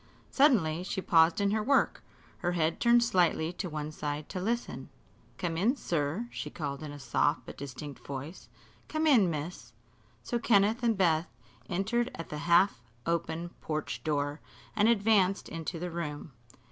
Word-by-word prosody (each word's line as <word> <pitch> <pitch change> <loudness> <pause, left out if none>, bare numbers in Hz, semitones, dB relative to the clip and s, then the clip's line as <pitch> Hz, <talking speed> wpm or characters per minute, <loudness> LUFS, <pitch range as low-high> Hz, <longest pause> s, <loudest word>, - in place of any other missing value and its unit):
Suddenly 195 - +4
she 185 - -3
paused 165 -1 +4
in 200 0 +2
her 215 +1 +1
work, 275 +5 +2 0.4
her 175 - -1
head 165 -1 0
turned 235 0 +5
slightly 175 -6 +2
to 180 0 -4
one 150 -1 -4
side 150 -1 -4
to 185 - -4
listen. 235 +5 -3 0.5
"Come 170 -3 -2
in, 225 - +2
sir," 170 - -2
she - - -5
called 140 -3 -5
in 155 -2 -6
a 145 - -8
soft 135 +2 +1
but - - -9
distinct 140 +1 -8
voice; 140 +6 -7 0.4
"come 310 +1 -1
in, 235 - +5
miss." 150 -6 -5 0.5
So 240 - -1
Kenneth 220 +1 +3
and 230 -3 +2
Beth 170 -2 +2 0.4
entered 220 +7 0
at 165 - -7
the 150 - -5
half 170 -7 +5 0.2
open 170 0 -2
porch 150 -7 -3
door 145 0 -1 0.3
and 215 +1 +4
advanced 200 -3 +3
into 165 +1 -4
the 175 +1 -4
room. 150 -3 -5
170 Hz, 160 wpm, -30 LUFS, 150-205 Hz, 0.5 s, turned